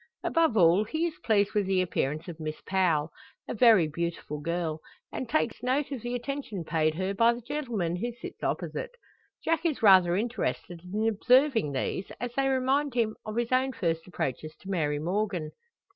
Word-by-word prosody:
Above 325 -8 +2
all 175 +2 +5
he 315 +10 -1
is 330 -2 -4
pleased 205 -2 +2
with 205 -2 +1
the 190 -1 +2
appearance 155 -3 -1
of 170 -2 -8
Miss 155 -1 -5
Powell, 170 -5 +1 0.4
a - - -3
very 220 -7 +6
beautiful 165 -1 -4
girl; 165 0 -2 0.3
and 255 - -5
takes 240 -6 0
note 265 +3 0
of 265 -5 -4
the 240 +2 -3
attention 245 -7 -4
paid 155 -1 +1
her 190 +3 -1
by 230 +3 +4
the 240 - -8
gentleman 235 - -2
who 240 +6 -2
sits 235 - -10
opposite. - - -3 0.5
Jack 325 0 +1
is 310 -8 -1
rather 185 -4 +7
interested 205 -5 -2
in 215 +2 0
observing 240 - +3
these, 160 +8 -3
as 240 +1 -4
they 270 +1 +1
remind 270 +1 +1
him 225 -3 +1
of 215 - -4
his 235 0 -1
own 260 +1 +2
first 165 -5 -2
approaches 155 -2 -4
to 195 - -7
Mary 150 -5 0
Morgan. 175 -1 -2
210 Hz, 180 wpm, -28 LUFS, 170-250 Hz, 0.5 s, rather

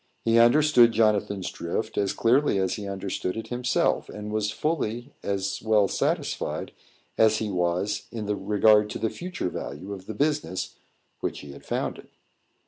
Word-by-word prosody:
He 115 0 +4
understood 120 -1 +6
Jonathan's 105 -3 +1
drift 110 +6 -3
as 100 -1 +1
clearly 125 0 +3
as 95 -1 +1
he 105 -1 -5
understood 95 0 -3
it 110 0 -6
himself, 125 -1 0
and 105 0 -7
was 105 -1 0
fully 120 0 -2
as 100 0 -2
well 110 -2 +3
satisfied - - -2 0.5
as 110 -1 +5
he 105 -2 -2
was 90 +3 -1
in 110 -3 -4 0.2
regard 105 0 +5
to - - -4
the 110 - -1
future 180 - -4
value 90 +4 -6
of 95 -1 -10
the 110 - -5
business 145 -8 -1 0.5
which - - -3
he 70 - -10
had 70 - -12
founded. - - -3
105 Hz, 155 wpm, -26 LUFS, 100-115 Hz, 0.5 s, understood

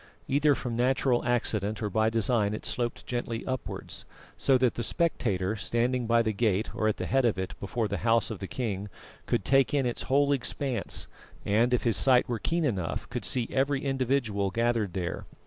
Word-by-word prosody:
Either 145 +1 +3
from 120 -3 -4
natural 125 0 +2
accident 110 -3 +1
or 105 - -1
by 110 +2 +2
design 110 -2 +1
it - - -7
sloped 120 -1 -2
gently 120 -2 -3
upwards, 130 0 -5 0.3
so 135 - +3
that 125 -2 +2
the - - -4
spectator, 110 - 0
standing 120 +3 0
by 115 0 +4
the 110 - 0
gate 105 -1 0
or 110 - 0
at 110 - 0
the - - -3
head 135 0 +2
of 115 -5 +2
it 95 -1 -3
before 110 +3 -2
the - - -2
house 115 0 +2
of 105 - -5
the 95 - -5
king, 105 -5 -3 0.4
could 95 - 0
take 135 +1 +3
in 135 -2 +2
its 120 - -2
whole 140 +1 +3
expanse, 130 -5 -1 0.4
and, 115 +4 +3
if 125 - +1
his 115 -4 +2
sight 125 +5 +4
were 120 -2 -2
keen 165 +8 0
enough, 95 - -2
could - - -3
see 120 -3 0
every 135 +1 0
individual 130 -7 0
gathered 115 -3 0
there. 90 -2 -3
115 Hz, 195 wpm, -28 LUFS, 105-130 Hz, 0.4 s, by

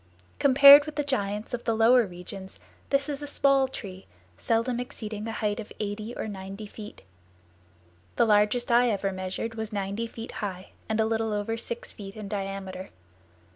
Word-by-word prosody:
Compared 280 +2 +9
with 305 - -6
the 295 - 0
giants 210 -7 -2
of 240 - -4
the 230 - +1
lower 230 +1 +5
regions 190 +2 -10 0.3
this 275 0 +1
is 290 -1 -4
a 290 - -5
small 275 -1 +3
tree, 190 -7 -8 0.3
seldom 230 - 0
exceeding 220 -4 -6
a - - -3
height 210 -1 -2
of 215 - -8
eighty 210 +2 -4
or - - -4
ninety 195 +1 -7
feet. 210 0 -11 1.1
The - - +4
largest 210 +3 +2
I 240 +1 +5
ever 200 -2 -1
measured 185 +4 -4
was 220 -1 -5
ninety 200 +2 -3
feet 225 +1 -8
high 190 -2 -5 0.2
and 220 0 0
a 220 - +3
little 225 0 -1
over 210 +2 -2
six 235 +1 -5
feet 195 -1 -10
in 215 -2 -7
diameter. 195 -2 -5
220 Hz, 175 wpm, -27 LUFS, 200-240 Hz, 1.1 s, Compared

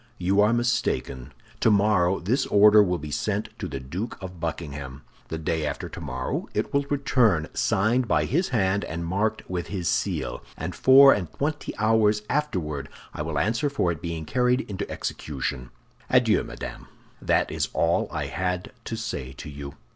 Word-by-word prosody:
You 95 +3 +2
are 105 +2 +4
mistaken. 120 - -1 0.3
Tomorrow 100 -3 +3
this 125 +9 0
order 105 +1 +7
will 90 -3 +1
be 75 -1 -7
sent 105 +8 -1
to 100 - -3
the 70 -4 -5
Duke 85 - -5
of 95 -2 -8
Buckingham. 75 -4 -5 0.2
The 80 - -4
day 80 0 -1
after 75 - -3
tomorrow 65 0 -4
it - - -1
will 140 0 +1
return 120 - +2
signed 120 +5 +1
by - - +2
his 175 +7 0
hand 100 -4 +1
and 85 +1 -4
marked 105 +5 -1
with 90 -2 -3
his 95 -4 -3
seal; - - -1 0.2
and 80 +4 -4
four 135 +1 +8
and 90 -6 -3
twenty 145 +1 -3
hours 110 -1 +3
afterward 80 - -2 0.2
I - - -5
will 75 -1 -3
answer 115 - +1
for 90 -11 0
its 80 - -6
being 85 -2 -4
carried 125 - +2
into 100 -4 -5
execution. 65 -4 -4 0.4
Adieu, - - +4
madame. - - -8 0.3
That - - +1
is - - -1
all - - +1
I - - -2
had 90 -1 -3
to 115 - -3
say 75 - -5
to 70 - -9
you." 70 0 -8
95 Hz, 170 wpm, -25 LUFS, 80-110 Hz, 0.4 s, four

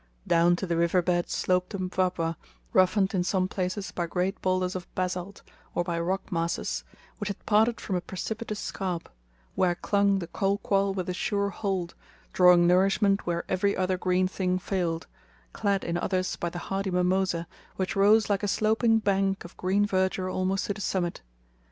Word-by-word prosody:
Down 170 +1 +4
to 185 - -3
the 170 -2 -1
river 170 +1 +2
bed 175 0 0
sloped 180 0 0
the 200 - -4
Mpwapwa, 180 -3 -1 0.4
roughened 190 +1 +3
in 180 -2 +1
some 185 0 +1
places 185 +1 -3
by 175 -1 -2
great 180 +3 -2
boulders 185 0 0
of 180 -1 -5
basalt, 185 +1 -3 0.3
or - - +1
by 170 -1 -2
rock 190 +3 -2
masses, 170 -1 -1 0.4
which 205 - -3
had 200 - -6
parted 220 +2 +3
from 190 - -3
a 180 - 0
precipitous 215 +3 -5
scarp, 180 -3 -4 0.4
where 180 -2 +2
clung 200 +2 +2
the 180 - -3
kolquall 195 +2 0
with 185 -2 -3
a 180 - -1
sure 200 +2 0
hold, 190 -3 -2 0.4
drawing 180 -1 +6
nourishment 195 +2 +3
where 170 -1 -1
every 200 +2 +1
other 185 0 +1
green 185 0 +2
thing 185 -1 -1
failed; 175 -3 -2 0.5
clad 200 -1 0
in 170 0 -1
others 185 0 -1
by 170 - -3
the 175 - -7 0.2
hardy 195 0 -1
mimosa, 180 -1 +1 0.3
which 190 -1 -2
rose 210 +2 +5
like 200 -2 +1
a 205 - -1
sloping 220 +3 +3
bank 195 -3 0
of 175 - -12
green 195 +3 +1
verdure 185 -1 0
almost 190 +1 0
to 205 - -1
the 205 - -8
summit. 180 -3 -1
185 Hz, 175 wpm, -27 LUFS, 180-195 Hz, 0.5 s, drawing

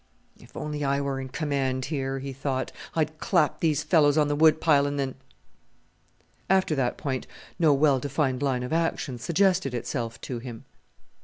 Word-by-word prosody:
"If - - -14
only 150 -1 -4
I 140 0 +1
were 140 -1 -2
in 130 - -7
command 135 -2 -1
here," 135 -2 -2
he 135 0 -5
thought, 135 0 -2 0.2
"I'd 155 -1 -1
clap 175 -9 +1
these 155 -3 +1
fellows 150 -4 +4
on 150 -1 +3
the 145 - +1
Wood 155 +1 +5
pile, 145 -3 +4
and 145 0 -3
then 135 -2 -1 0.7
" - - -40 0.5
After 190 -3 +3
that 130 -4 0
point 130 -3 -3 0.3
no 160 -3 +5
well 140 -1 +4
defined 135 -1 -1
line 130 -3 0
of 125 - -4
action 160 -6 -1
suggested 170 - +1
itself 115 -1 -4
to 125 -3 -5
him. 115 -2 -9
140 Hz, 175 wpm, -26 LUFS, 130-155 Hz, 0.7 s, Wood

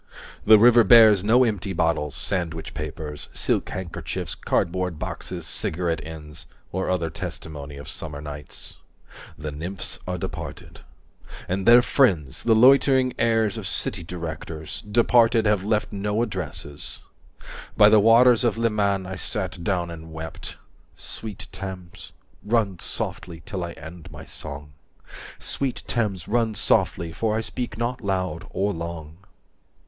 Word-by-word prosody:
The 110 0 +10
river 120 +2 +7
bears 110 -2 +7
no 120 +5 +5
empty 105 -4 -1
bottles, 80 -5 0
sandwich 80 -4 -2
papers, 75 -1 -5
Silk - - 0
handkerchiefs, 95 -2 -5
cardboard 90 -1 -1
boxes, - - -5
cigarette 85 0 -1
ends 75 -1 -10 0.2
Or 95 +1 -2
other 85 -3 0
testimony 75 -2 -7
of 70 +1 -9
summer 75 -1 -6
nights. 75 0 -8 0.6
The 75 0 -5
nymphs 90 +6 -5
are 90 0 -2
departed. - - -7 0.7
And 95 +1 -2
their 120 +1 +8
friends, 90 - +2
the 115 -1 +3
loitering 130 +1 +5
heirs 115 -3 +2
of - - -4
city - - -2
directors; 80 -2 -6
180 105 - -12
Departed, 115 0 +4
have 105 -3 +2
left 105 0 0
no 105 +3 0
addresses. 75 -9 -6 0.8
By - - +8
the 110 - +7
waters 115 +3 +6
of 115 -3 +1
Leman 105 -4 +1
I 95 0 -6
sat 95 -3 -3
down 90 -2 -1
and 80 -1 -9
wept… 80 -1 -7 0.4
Sweet 105 -3 -5
Thames, 95 -2 -8 0.3
run 105 -5 +1
softly 85 -2 -4
till 95 -5 -4
I 85 -1 -5
end 80 +1 -11
my - - -10
song, 70 -1 -7 0.6
Sweet 135 -3 -3
Thames, 100 -8 -1
run 115 -1 +1
softly, 85 -3 +1
for 110 +3 0
I - - 0
speak 115 -1 -4
not 120 +2 -2
loud 95 -3 -2
or 100 +1 -1
long. 80 -2 -6
95 Hz, 140 wpm, -24 LUFS, 80-110 Hz, 0.8 s, The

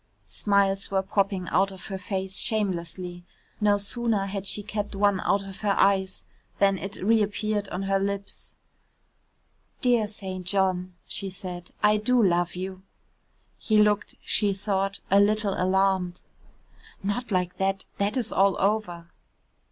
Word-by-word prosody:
Smiles 200 -1 +1
were 190 -1 +1
popping 195 -2 0
out 195 +1 +2
of 190 -2 -9
her 195 -2 -5
face 190 -1 -3
shamelessly. 180 -4 -1 0.4
No 205 -1 +3
sooner 210 0 0
had 195 0 -4
she 210 - +1
kept 205 0 -4
one 200 -1 +2
out 200 +1 +1
of 195 -1 -9
her 205 -2 +1
eyes 190 -1 +2 0.3
than 195 -1 +3
it 195 +1 -6
reappeared 210 -1 +1
on 185 +2 -3
her 195 0 +1
lips. 200 0 -4 1.3
"Dear 240 -4 +3
St. 190 -3 -6
John," 185 -1 0
she 195 - 0
said, 180 -2 -7
"I 210 0 +5
do 245 +4 +2
love 175 -2 +2
you." 185 +1 -5 0.8
He 215 - +2
looked, 210 0 +2
she 205 -2 +2
thought, 195 0 -1
a 200 - +6
little 210 0 +2
alarmed. 185 -1 +1 0.8
"Not 215 +5 -2
like 180 -1 0
that, 195 0 -1
that 205 +4 0
is 235 -4 -1
all 195 0 +3
over." 190 -5 -1
195 Hz, 145 wpm, -26 LUFS, 190-205 Hz, 1.3 s, a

